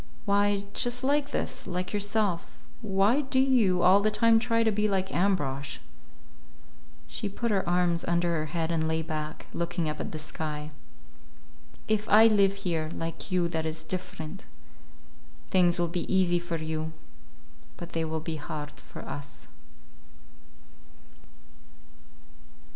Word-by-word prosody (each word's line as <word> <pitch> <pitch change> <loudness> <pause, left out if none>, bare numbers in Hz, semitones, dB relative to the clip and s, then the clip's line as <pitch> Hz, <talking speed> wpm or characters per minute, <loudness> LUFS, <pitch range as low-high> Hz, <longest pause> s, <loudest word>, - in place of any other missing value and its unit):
"Why, 200 0 +2
just 245 +2 +2
like 285 +1 +2
this; - - -3
like 180 +2 -3
yourself. 205 -3 -1 0.2
Why 205 +7 +3
do 265 -2 -2
you 230 -10 +3
all 190 +2 +7
the 210 +1 +2
time 225 +1 +4
try 230 0 +1
to 220 - +3
be 210 +1 +1
like 190 -2 -1
Ambrosch?" 140 -8 0 1.3
She 120 - -4
put 230 +3 -2
her 190 -4 0
arms 175 -1 +2
under 170 0 +1
her 155 -1 -1
head 165 +1 -2
and 160 -1 0
lay 160 0 0
back, 155 -1 -5
looking 170 -1 -1
up 150 0 -3
at - - -4
the 155 - -5
sky. 150 -1 -5 1.2
"If 215 0 0
I 215 +2 +8
live 200 -2 +3
here, 160 -3 0
like 165 +2 -5
you, 180 -2 +2
that 160 -1 -2
is 160 0 -3
different. 185 -1 -6 1.0
Things 175 -2 +4
will 175 0 +1
be 170 0 -3
easy 180 -2 +3
for 170 -1 -3
you. 160 0 -3 0.8
But 175 - -7
they 165 - -1
will 160 0 -2
be 160 0 -4
hard 150 0 -6
for - - -12
us." 130 -4 -7
175 Hz, 140 wpm, -28 LUFS, 160-205 Hz, 1.3 s, I